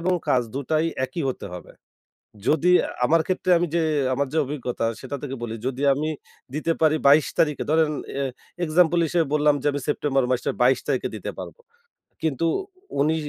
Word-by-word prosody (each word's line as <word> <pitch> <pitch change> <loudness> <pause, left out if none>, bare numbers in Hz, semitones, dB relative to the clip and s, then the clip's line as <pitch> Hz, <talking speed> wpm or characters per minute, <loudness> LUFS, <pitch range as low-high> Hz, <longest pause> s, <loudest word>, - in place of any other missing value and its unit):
এবং 180 +2 +1
কাজ 125 -1 +3
দুটাই 155 +4 0 0.2
একই 130 +6 -4
হতে 125 - -4
হবে। 90 - -10 0.8
যদি 165 +3 +3 0.4
আমার 165 +3 +4
ক্ষেত্রে 185 0 -1
আমি 175 +1 0
যে, 170 - +3 0.3
আমার 140 +2 0
যে, 160 - 0
অভিজ্ঞতা 125 -4 -3 0.2
সেটা 135 +2 -5
থেকে 135 -2 -5
বলি, 115 -1 -4
যদি 130 +1 -3
আমি 155 +3 -2 0.4
দিতে 155 +2 0
পারি 155 -1 +4
২২ 145 +2 +6
তারিখে 150 -2 +2
ধরেন 155 0 +3 0.3
এ - - 0 0.4
এক্সাম্পল 170 +1 +3
হিসেবে 170 0 +1
বললাম 150 -1 +4
যে 145 - 0
আমি 145 -1 -3
সেপ্টেম্বর 140 -2 +1
মাসের 125 - 0
২২ 130 +2 +4
তারিখে - - 0
দিতে - - -5
পারবো। - - -8 0.6
কিন্তু 160 0 0 0.5
উনি 155 +3 +3
150 Hz, 170 wpm, -24 LUFS, 135-160 Hz, 0.8 s, ২২